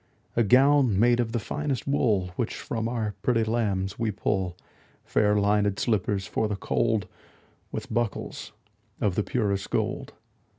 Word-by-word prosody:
A 120 Hz, -, +3 dB
gown 130 Hz, -1 st, +5 dB
made 120 Hz, +2 st, +4 dB
of 115 Hz, -2 st, 0 dB
the 120 Hz, -, 0 dB
finest 140 Hz, +2 st, -3 dB
wool 110 Hz, -10 st, +1 dB
Which 120 Hz, -, -2 dB
from 120 Hz, -5 st, -3 dB
our 110 Hz, -3 st, -2 dB
pretty 115 Hz, -2 st, +2 dB
lambs 100 Hz, -4 st, -1 dB
we 115 Hz, -2 st, +1 dB
pull; 95 Hz, -3 st, -1 dB, 0.5 s
Fair 105 Hz, 0 st, +2 dB
linèd 105 Hz, -1 st, +2 dB
slippers 100 Hz, -3 st, 0 dB
for 110 Hz, -, -1 dB
the 105 Hz, -, -2 dB
cold, 110 Hz, +1 st, 0 dB
15 -, -, -20 dB, 0.6 s
With -, -, -5 dB
buckles 120 Hz, -4 st, -2 dB, 0.5 s
of 100 Hz, -, +1 dB
the 105 Hz, -, +1 dB
purest 100 Hz, -4 st, -1 dB
gold. -, -, -2 dB
110 Hz, 155 wpm, -26 LUFS, 100-120 Hz, 0.6 s, gown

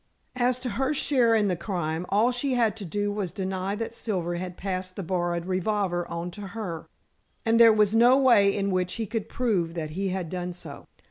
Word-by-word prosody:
As 250 Hz, 0 st, +2 dB
to 250 Hz, -, -3 dB
her 265 Hz, +7 st, 0 dB
share 250 Hz, -5 st, +3 dB
in 210 Hz, -2 st, +3 dB
the 185 Hz, -, +1 dB
crime, 170 Hz, -2 st, -3 dB
all 215 Hz, +5 st, +3 dB
she 255 Hz, +2 st, -1 dB
had 230 Hz, -3 st, +2 dB
to 205 Hz, -, -6 dB
do 205 Hz, +4 st, -1 dB
was 200 Hz, -4 st, -3 dB
to 195 Hz, -, -4 dB
deny 190 Hz, +1 st, -2 dB
that 230 Hz, +1 st, -4 dB
Silver 185 Hz, -7 st, -2 dB
had 180 Hz, +1 st, -5 dB
passed 185 Hz, -1 st, -4 dB
the 195 Hz, -, -4 dB
borrowed 175 Hz, -1 st, -1 dB
revolver 185 Hz, -1 st, -1 dB
on 170 Hz, +1 st, -5 dB
to 205 Hz, -, -9 dB, 0.2 s
her, 170 Hz, -7 st, -5 dB, 0.6 s
and 230 Hz, 0 st, +3 dB
there 230 Hz, -1 st, +9 dB
was 210 Hz, -1 st, +3 dB
no 240 Hz, +3 st, +6 dB
way 235 Hz, -7 st, +5 dB
in 200 Hz, 0 st, 0 dB
which 185 Hz, -1 st, 0 dB
he 230 Hz, -, -3 dB
could 220 Hz, 0 st, -4 dB
prove 185 Hz, -9 st, 0 dB
that 155 Hz, -2 st, -4 dB
he 195 Hz, +5 st, -2 dB
had 185 Hz, -2 st, -3 dB
done 180 Hz, -1 st, -3 dB
so. 165 Hz, -5 st, -10 dB
195 Hz, 215 wpm, -26 LUFS, 180-225 Hz, 0.6 s, there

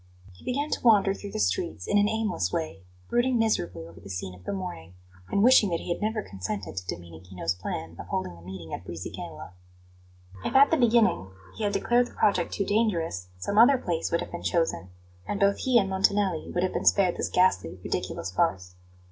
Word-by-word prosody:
He 90 Hz, -, -18 dB
began 285 Hz, +4 st, -2 dB
to -, -, -1 dB
wander 205 Hz, -4 st, +5 dB
through 200 Hz, 0 st, -8 dB
the -, -, -3 dB
streets 90 Hz, -3 st, -1 dB
in 205 Hz, -, +3 dB
an 205 Hz, +1 st, +3 dB
aimless 220 Hz, -5 st, -1 dB
way, 160 Hz, -, -3 dB, 0.3 s
brooding 245 Hz, +1 st, +2 dB
miserably 90 Hz, -, 0 dB
over 85 Hz, 0 st, -14 dB
the 95 Hz, +3 st, -12 dB
scene 90 Hz, 0 st, -5 dB
of 90 Hz, 0 st, -16 dB
the -, -, -2 dB
morning, 180 Hz, -, -6 dB, 0.3 s
and 200 Hz, -, +2 dB
wishing 240 Hz, -4 st, +6 dB
that 170 Hz, -1 st, -1 dB
he 175 Hz, -, -1 dB
had -, -, -10 dB
never 215 Hz, 0 st, -1 dB
consented 95 Hz, -2 st, -5 dB
to 90 Hz, -1 st, -5 dB
Domenichino's 85 Hz, +1 st, -4 dB
plan 85 Hz, -2 st, -5 dB
of 85 Hz, -, -8 dB
holding 90 Hz, -1 st, -3 dB
the 85 Hz, -, -15 dB
meeting 90 Hz, -2 st, -9 dB
in -, -, -3 dB
Brisighella. 85 Hz, +1 st, -8 dB, 0.9 s
If 250 Hz, -, -3 dB
at 275 Hz, +1 st, +7 dB
the 325 Hz, -, +4 dB
beginning 230 Hz, -, +3 dB, 0.3 s
he 215 Hz, -, -2 dB
had 205 Hz, -, 0 dB
declared 240 Hz, +5 st, +2 dB
the -, -, -16 dB
project 200 Hz, -5 st, +2 dB
too 200 Hz, -, -1 dB
dangerous, 175 Hz, -, 0 dB
some 200 Hz, -, 0 dB
other 265 Hz, +4 st, +7 dB
place 170 Hz, -8 st, -2 dB
would 170 Hz, -, +1 dB
have -, -, -7 dB
been 175 Hz, -, -6 dB
chosen; 160 Hz, -, 0 dB, 0.4 s
and 205 Hz, -, -2 dB
both 200 Hz, -1 st, +3 dB
he 255 Hz, -2 st, +3 dB
and 200 Hz, -4 st, +3 dB
Montanelli 190 Hz, -2 st, +1 dB
would 175 Hz, -, 0 dB
have 185 Hz, -, 0 dB
been -, -, -2 dB
spared 185 Hz, -3 st, +4 dB
this -, -, -2 dB
ghastly, 95 Hz, -, +2 dB
ridiculous 95 Hz, -, -3 dB
farce. 90 Hz, 0 st, 0 dB
175 Hz, 205 wpm, -27 LUFS, -, 0.9 s, at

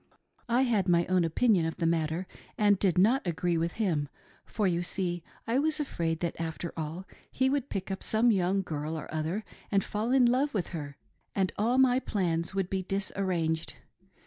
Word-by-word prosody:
I 245 Hz, +3 st, +4 dB
had 225 Hz, -7 st, +1 dB
my 170 Hz, -1 st, +4 dB
own 185 Hz, -1 st, +2 dB
opinion 170 Hz, +1 st, +3 dB
of 165 Hz, -, -5 dB
the 165 Hz, -, -1 dB
matter 165 Hz, +1 st, 0 dB, 0.3 s
and 205 Hz, -2 st, +4 dB
did 185 Hz, -4 st, +2 dB
not 230 Hz, +9 st, +4 dB
agree 175 Hz, 0 st, 0 dB
with 165 Hz, +1 st, 0 dB
him, 165 Hz, -10 st, 0 dB, 0.4 s
for 210 Hz, -, -1 dB
you 175 Hz, -2 st, +1 dB
see 175 Hz, -1 st, -2 dB, 0.2 s
I 235 Hz, +3 st, +1 dB
was 310 Hz, +1 st, +1 dB
afraid 165 Hz, -, -2 dB
that 170 Hz, -1 st, -2 dB
after 165 Hz, +1 st, -4 dB
all, 160 Hz, +4 st, -5 dB, 0.2 s
he 260 Hz, +1 st, +1 dB
would 280 Hz, -1 st, -1 dB
pick 195 Hz, 0 st, -4 dB
up 190 Hz, -, -4 dB
some 230 Hz, +2 st, +3 dB
young 190 Hz, 0 st, +1 dB
girl 155 Hz, -1 st, -4 dB
or 155 Hz, -, -7 dB
other 160 Hz, +7 st, -2 dB, 0.3 s
and 195 Hz, -2 st, +3 dB
fall 215 Hz, +3 st, -2 dB
in 260 Hz, -1 st, +5 dB
love 255 Hz, +3 st, +2 dB
with 190 Hz, -, -1 dB
her, 145 Hz, -5 st, -6 dB, 0.4 s
and 190 Hz, -2 st, +1 dB
all 235 Hz, +5 st, +1 dB
my 260 Hz, -1 st, +5 dB
plans 175 Hz, -7 st, -1 dB
would 195 Hz, -2 st, 0 dB
be 190 Hz, 0 st, -1 dB
disarranged. 185 Hz, -4 st, -1 dB
185 Hz, 190 wpm, -29 LUFS, 165-220 Hz, 0.4 s, in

